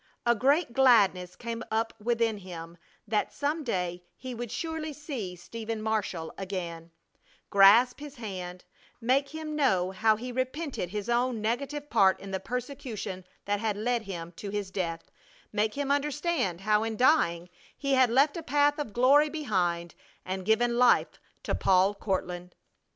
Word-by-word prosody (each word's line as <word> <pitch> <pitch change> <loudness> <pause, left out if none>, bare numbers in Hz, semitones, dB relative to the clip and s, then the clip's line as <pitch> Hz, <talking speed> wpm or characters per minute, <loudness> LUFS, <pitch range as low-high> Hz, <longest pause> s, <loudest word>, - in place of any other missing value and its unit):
A 235 - +5
great 275 +4 +2
gladness 200 -9 +4
came 235 -1 -5
up 225 +1 0
within 230 -1 +1
him 170 -3 -9 0.3
that 210 0 0
some 300 +3 -2
day 180 -7 -2 0.2
he 255 0 -6
would 240 0 -5
surely 320 +2 -4
see 265 - -5
Stephen 225 +5 -6
Marshall 210 -7 -2
again, 175 -4 -5 0.6
grasp 210 +7 +6
his 295 -1 -9
hand, 185 -6 -7 0.3
make 265 +4 +2
him 310 0 -5
know 190 -11 +2
how 215 +3 +3
he 245 +4 -6
repented 260 - -3
his 210 +2 -4
own 240 0 +1
negative 280 +7 -2
part 195 -4 +4
in 195 - -8
the 190 - -1
persecution 235 -5 -5 0.2
that 205 0 0
had 215 -2 -1
led 240 +2 0
him 175 -5 -7
to 200 - -6
his 200 -2 -3
death; 170 -4 -4 0.4
make 215 +1 0
him 280 -1 -1
understand 285 - 0
how 210 +1 +3
in 225 -1 -3
dying 180 - +3 0.3
he 275 -1 -1
had 260 -2 +5
left 275 +5 +3
a 335 - -4
path 290 0 +2
of 280 -8 -4
glory 280 +6 +5
behind 180 - -1 0.3
and 185 0 -4
given 235 +3 +2
life 250 -1 +4 0.2
to - - -2
Paul 190 +1 +3
Courtland. 180 -3 -3
225 Hz, 155 wpm, -28 LUFS, 190-265 Hz, 0.6 s, grasp